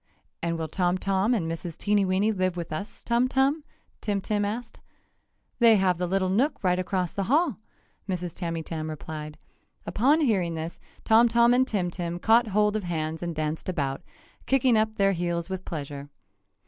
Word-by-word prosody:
"And 170 Hz, 0 st, -1 dB
will 160 Hz, -1 st, -3 dB
Tom 180 Hz, +2 st, 0 dB
Tom 195 Hz, +5 st, +1 dB
and 185 Hz, -8 st, -1 dB
Mrs. 165 Hz, 0 st, -5 dB
Teenyweeny 200 Hz, 0 st, +2 dB
live 185 Hz, -3 st, -1 dB
with 170 Hz, -2 st, -5 dB
us, 200 Hz, +7 st, -6 dB
Tum 235 Hz, +1 st, +2 dB
Tum?" 270 Hz, +4 st, +1 dB, 0.4 s
Tim 205 Hz, -2 st, -1 dB
Tim 205 Hz, +1 st, -1 dB
asked. 225 Hz, +3 st, -4 dB, 0.8 s
"They 230 Hz, -2 st, +7 dB
have 185 Hz, -3 st, +2 dB
the 180 Hz, -, 0 dB
little 190 Hz, +1 st, +1 dB
nook 235 Hz, +7 st, +1 dB
right 180 Hz, -1 st, +2 dB
across 185 Hz, -1 st, -1 dB
the 195 Hz, -, -2 dB
hall!" 300 Hz, -, +2 dB, 0.5 s
Mrs. 180 Hz, -2 st, -3 dB
Tamytam 165 Hz, -2 st, -4 dB
replied. 155 Hz, 0 st, -7 dB, 0.5 s
Upon 280 Hz, +9 st, +3 dB
hearing 190 Hz, -, +1 dB
this 160 Hz, +1 st, -5 dB, 0.3 s
Tom 225 Hz, +2 st, +6 dB
Tom 235 Hz, +1 st, +4 dB
and 260 Hz, +1 st, +3 dB
Tim 185 Hz, -7 st, -1 dB
Tim 175 Hz, -1 st, -4 dB
caught 230 Hz, +5 st, +4 dB
hold 210 Hz, +1 st, +2 dB
of 215 Hz, -, 0 dB
hands 160 Hz, -2 st, -3 dB
and 170 Hz, -2 st, -3 dB
danced 155 Hz, +3 st, -3 dB
about, 140 Hz, -6 st, -2 dB, 0.5 s
kicking 260 Hz, -2 st, +3 dB
up 220 Hz, 0 st, +1 dB
their 195 Hz, -2 st, +3 dB
heels 175 Hz, -1 st, -2 dB
with 190 Hz, -1 st, -4 dB
pleasure. 145 Hz, -2 st, -6 dB
185 Hz, 175 wpm, -26 LUFS, 170-220 Hz, 0.8 s, They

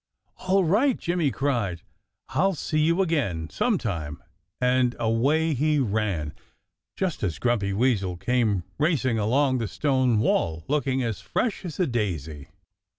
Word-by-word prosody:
"All 190 Hz, +1 st, +4 dB
right!" 225 Hz, -, +3 dB
Jimmy 170 Hz, -4 st, 0 dB
cried. 120 Hz, -, -1 dB, 0.5 s
"I'll 195 Hz, 0 st, +1 dB
see 155 Hz, +1 st, -1 dB
you 170 Hz, +5 st, +3 dB
again 100 Hz, -, -1 dB
sometime!" 95 Hz, -, -2 dB, 0.4 s
And 125 Hz, -1 st, +2 dB
away 140 Hz, +8 st, +1 dB
he 150 Hz, +3 st, +1 dB
ran, 100 Hz, -, -1 dB, 0.6 s
just 185 Hz, -4 st, -2 dB
as 90 Hz, -6 st, -1 dB
Grumpy 115 Hz, -5 st, 0 dB
Weasel 100 Hz, -5 st, +1 dB
came 105 Hz, -2 st, +1 dB, 0.2 s
racing 135 Hz, -7 st, +1 dB
along 130 Hz, +5 st, +2 dB
the 115 Hz, -, -2 dB
stone 130 Hz, +1 st, +1 dB
wall, 85 Hz, -6 st, 0 dB
looking 135 Hz, -3 st, 0 dB
as 115 Hz, -4 st, -3 dB
fresh 230 Hz, -5 st, -2 dB
as 170 Hz, 0 st, -6 dB
a 180 Hz, -, +3 dB
daisy. 80 Hz, -, -3 dB
125 Hz, 135 wpm, -25 LUFS, 100-155 Hz, 0.6 s, All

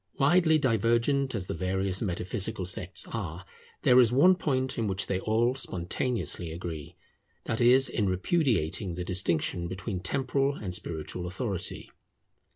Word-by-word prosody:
Widely 160 Hz, +2 st, +4 dB
divergent 125 Hz, +1 st, +1 dB
as 95 Hz, -4 st, -3 dB
the -, -, -4 dB
various 95 Hz, +2 st, -1 dB
metaphysical 95 Hz, 0 st, -2 dB
sects 95 Hz, 0 st, -1 dB
are, 90 Hz, -6 st, -5 dB, 0.4 s
there 125 Hz, 0 st, +6 dB
is 120 Hz, -3 st, +5 dB
one 170 Hz, +9 st, +6 dB
point 130 Hz, -8 st, -1 dB
in 110 Hz, -, 0 dB
which 95 Hz, 0 st, -1 dB
they 95 Hz, -, -1 dB
all 115 Hz, +4 st, +1 dB
spontaneously 95 Hz, -4 st, -1 dB
agree; 80 Hz, -3 st, -7 dB, 0.5 s
that 110 Hz, +2 st, -2 dB
is, 130 Hz, +3 st, +6 dB
in 105 Hz, -4 st, -1 dB
repudiating 95 Hz, -, 0 dB
the 90 Hz, 0 st, -4 dB
distinction 85 Hz, -1 st, 0 dB
between 95 Hz, +2 st, -4 dB
temporal 135 Hz, +6 st, 0 dB
and 95 Hz, -8 st, -5 dB
spiritual 85 Hz, +1 st, -4 dB
authority. 95 Hz, 0 st, -4 dB
100 Hz, 140 wpm, -28 LUFS, 90-130 Hz, 0.5 s, there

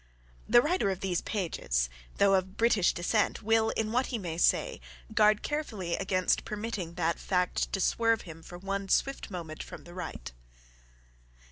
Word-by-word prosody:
The 240 Hz, +2 st, +7 dB
writer 335 Hz, -, +1 dB
of 190 Hz, -1 st, -3 dB
these 185 Hz, -3 st, 0 dB
pages, -, -, -1 dB, 0.3 s
though 200 Hz, -1 st, +5 dB
of 190 Hz, 0 st, 0 dB
British 225 Hz, -5 st, +4 dB
descent, 210 Hz, +6 st, 0 dB
will, 225 Hz, +1 st, +3 dB
in 220 Hz, -1 st, -1 dB
what 250 Hz, +3 st, +1 dB
he 240 Hz, -, -2 dB
may 170 Hz, -5 st, -4 dB
say, -, -, +2 dB, 0.3 s
guard 210 Hz, -1 st, +4 dB
carefully 220 Hz, -, -2 dB
against 185 Hz, -2 st, +1 dB
permitting 205 Hz, -5 st, -4 dB
that 170 Hz, -2 st, 0 dB
fact 180 Hz, -1 st, 0 dB
to 195 Hz, -, -1 dB
swerve 230 Hz, +4 st, +2 dB
him 165 Hz, -2 st, -10 dB
for 175 Hz, +2 st, -10 dB
one 195 Hz, +1 st, -3 dB
swift 275 Hz, +7 st, +1 dB
moment 165 Hz, -5 st, -6 dB
from -, -, -9 dB
the 175 Hz, -, -12 dB
right. 60 Hz, -, -6 dB
195 Hz, 160 wpm, -30 LUFS, 175-220 Hz, 0.3 s, The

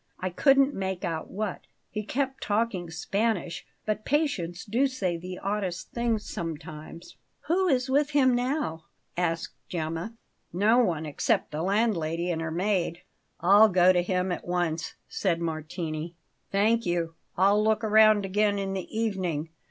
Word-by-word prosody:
I 185 Hz, -1 st, -2 dB
couldn't 275 Hz, -, +4 dB
make 190 Hz, -2 st, -3 dB
out 165 Hz, -2 st, -3 dB
what; 205 Hz, -1 st, -3 dB, 0.3 s
he 210 Hz, -, -2 dB
kept 270 Hz, +4 st, -2 dB
talking 205 Hz, -5 st, -1 dB
Spanish; 185 Hz, +2 st, -2 dB, 0.2 s
but 215 Hz, 0 st, -1 dB
patients 205 Hz, -, -1 dB
do 240 Hz, +6 st, +2 dB
say 195 Hz, -10 st, -2 dB
the 180 Hz, +2 st, -6 dB
oddest 190 Hz, -4 st, -3 dB
things 235 Hz, -3 st, -1 dB
sometimes." 165 Hz, 0 st, -7 dB, 0.2 s
"Who 370 Hz, +4 st, +1 dB
is 260 Hz, -5 st, +2 dB
with 285 Hz, +2 st, +2 dB
him 275 Hz, -4 st, +4 dB
now?" 245 Hz, -, -1 dB, 0.3 s
asked 170 Hz, -2 st, -1 dB, 0.2 s
Gemma. 165 Hz, +5 st, -3 dB, 0.4 s
"No 210 Hz, +7 st, +4 dB
one 165 Hz, -10 st, +1 dB
except 150 Hz, -, 0 dB
the 150 Hz, +1 st, -3 dB
landlady 175 Hz, -4 st, +1 dB
and 165 Hz, -1 st, -2 dB
her 165 Hz, -, -2 dB
maid." 175 Hz, 0 st, -1 dB, 0.4 s
"I'll 205 Hz, +4 st, +7 dB
go 185 Hz, -1 st, +5 dB
to 180 Hz, -, +3 dB
him 180 Hz, +1 st, 0 dB
at 175 Hz, -, -4 dB
once," 175 Hz, -2 st, -1 dB
said 175 Hz, -4 st, 0 dB
Martini. 160 Hz, 0 st, -4 dB, 0.4 s
"Thank 220 Hz, +4 st, +3 dB
you. 170 Hz, -1 st, -1 dB, 0.2 s
I'll 200 Hz, +3 st, +4 dB
look 220 Hz, +1 st, +2 dB
round 215 Hz, -1 st, +5 dB
again 205 Hz, +1 st, +1 dB
in 195 Hz, -1 st, -2 dB
the 190 Hz, -2 st, -4 dB
evening. 185 Hz, -8 st, -2 dB
190 Hz, 150 wpm, -27 LUFS, 170-220 Hz, 0.4 s, I'll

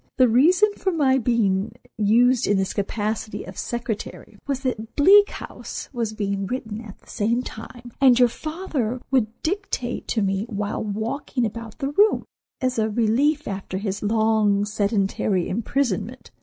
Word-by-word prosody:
The 255 Hz, -1 st, +6 dB
reason 350 Hz, -, +4 dB
for 380 Hz, -, 0 dB
my 270 Hz, -6 st, +3 dB
being 215 Hz, -4 st, +1 dB, 0.2 s
used 235 Hz, +4 st, +3 dB
in 205 Hz, -, +3 dB
this 190 Hz, 0 st, -1 dB
capacity 215 Hz, +1 st, -3 dB
of 185 Hz, -, -10 dB
secretary 235 Hz, -1 st, -5 dB
was 275 Hz, -2 st, -1 dB
that 235 Hz, -4 st, -4 dB
'Bleak 405 Hz, +7 st, +7 dB
House' -, -, -7 dB
was 230 Hz, -3 st, -2 dB
being 200 Hz, -2 st, -2 dB
written 225 Hz, -3 st, -4 dB
at 210 Hz, -4 st, -11 dB
the -, -, -28 dB
same 235 Hz, +3 st, 0 dB
time, 240 Hz, +2 st, -9 dB
and 255 Hz, -3 st, +6 dB
your 250 Hz, -1 st, +6 dB
father 285 Hz, -, -3 dB
would 255 Hz, -5 st, +3 dB, 0.2 s
dictate 360 Hz, -9 st, -3 dB
to 220 Hz, -, 0 dB
me 195 Hz, +3 st, -1 dB
while 205 Hz, -2 st, -3 dB
walking 225 Hz, +4 st, -2 dB
about 225 Hz, 0 st, -6 dB
the 275 Hz, -2 st, -2 dB
room, 415 Hz, +8 st, +3 dB, 0.4 s
as 255 Hz, -2 st, 0 dB
a 220 Hz, 0 st, +1 dB
relief 245 Hz, +8 st, +1 dB
after 195 Hz, -1 st, -4 dB
his 200 Hz, 0 st, -3 dB
long, 215 Hz, -1 st, +2 dB
sedentary 200 Hz, -3 st, 0 dB
imprisonment. 240 Hz, +6 st, -2 dB
230 Hz, 155 wpm, -23 LUFS, 210-260 Hz, 0.4 s, Bleak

